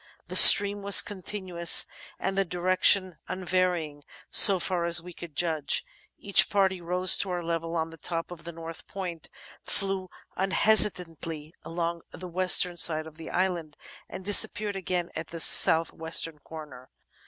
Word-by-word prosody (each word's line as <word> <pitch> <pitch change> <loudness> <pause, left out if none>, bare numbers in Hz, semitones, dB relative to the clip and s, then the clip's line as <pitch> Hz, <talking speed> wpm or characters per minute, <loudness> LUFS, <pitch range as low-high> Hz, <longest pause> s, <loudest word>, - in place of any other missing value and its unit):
The - - -7
stream 205 0 +7
was 200 0 +3
continuous 185 -3 -1 0.3
and 195 - -6
the 195 - -1
direction 185 0 -1
unvarying, 180 -5 -5 0.3
so 195 -2 +6
far 175 -1 -4
as 170 0 +2
we 175 +2 -14
could 165 -3 -14
judge. 155 -4 -3 0.3
Each 200 - +3
party 190 -2 -2
rose 180 +2 +2
to 195 - -4
our 175 -1 -6
level 165 0 -6
on 165 0 -5
the 165 - -17
top 165 +1 -7
of 170 -2 -13
the 170 - -10
north 165 0 -13
point, 180 -5 -10 0.3
flew 195 -1 -5 0.3
unhesitatingly 180 -6 -1
along 170 0 -7
the 185 - -12
western 180 0 +1
side 155 -2 -1
of 160 -1 -12
the 160 - -12
island, 175 -5 -5 0.3
and 185 - -12
disappeared 205 0 +2
again 180 -2 -6
at 160 - -8
the 165 - -10
south 165 0 +7
western 160 -1 -2
corner. 150 -5 -15
175 Hz, 155 wpm, -24 LUFS, 165-185 Hz, 0.3 s, stream